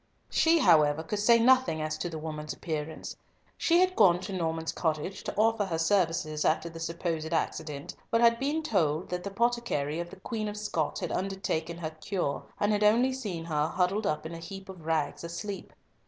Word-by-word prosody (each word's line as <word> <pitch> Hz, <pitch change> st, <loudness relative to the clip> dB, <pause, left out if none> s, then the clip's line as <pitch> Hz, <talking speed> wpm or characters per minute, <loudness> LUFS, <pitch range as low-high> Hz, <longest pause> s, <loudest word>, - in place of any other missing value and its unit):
She, 330 Hz, +1 st, +4 dB
however, 155 Hz, -, +4 dB
could 205 Hz, +6 st, -3 dB
say 230 Hz, +3 st, +6 dB
nothing 255 Hz, -7 st, +4 dB
as 155 Hz, 0 st, -2 dB
to 175 Hz, -, -2 dB
the 160 Hz, -, -5 dB
woman's 155 Hz, -1 st, -5 dB
appearance. 155 Hz, -1 st, -5 dB, 0.4 s
She 340 Hz, +1 st, +3 dB
had 370 Hz, 0 st, +2 dB
gone 175 Hz, -2 st, +5 dB
to 195 Hz, -, -5 dB
Norman's 160 Hz, -2 st, -1 dB
cottage 160 Hz, +3 st, -2 dB
to -, -, -4 dB
offer 225 Hz, 0 st, +3 dB
her 170 Hz, -4 st, -2 dB
services 165 Hz, -3 st, +1 dB
after 165 Hz, +1 st, +1 dB
the 165 Hz, 0 st, -9 dB
supposed 165 Hz, -1 st, -3 dB
accident, 155 Hz, -3 st, -2 dB, 0.2 s
but 230 Hz, -, +2 dB
had 235 Hz, 0 st, +5 dB
been 295 Hz, +4 st, 0 dB
told 170 Hz, -, +1 dB
that 180 Hz, 0 st, -2 dB
the 200 Hz, -, -3 dB
potticary 200 Hz, -9 st, 0 dB
of 170 Hz, 0 st, -4 dB
the 195 Hz, -, -12 dB
Queen 215 Hz, +1 st, -3 dB
of 210 Hz, 0 st, -5 dB
Scots 170 Hz, -7 st, -2 dB
had -, -, -3 dB
undertaken 180 Hz, -4 st, -2 dB
her 160 Hz, -2 st, -4 dB
cure, 160 Hz, -2 st, -2 dB, 0.2 s
and 205 Hz, -, +2 dB
had 210 Hz, 0 st, +1 dB
only 240 Hz, +5 st, +4 dB
seen 200 Hz, -11 st, -4 dB
her 150 Hz, -2 st, 0 dB
huddled 190 Hz, +5 st, 0 dB
up 155 Hz, 0 st, -1 dB
in 160 Hz, -, -5 dB
a 165 Hz, -, -6 dB
heap 190 Hz, +3 st, -9 dB
of 175 Hz, -4 st, -10 dB
rags, 160 Hz, 0 st, 0 dB
asleep. 190 Hz, +4 st, -6 dB
175 Hz, 200 wpm, -29 LUFS, 160-210 Hz, 0.4 s, say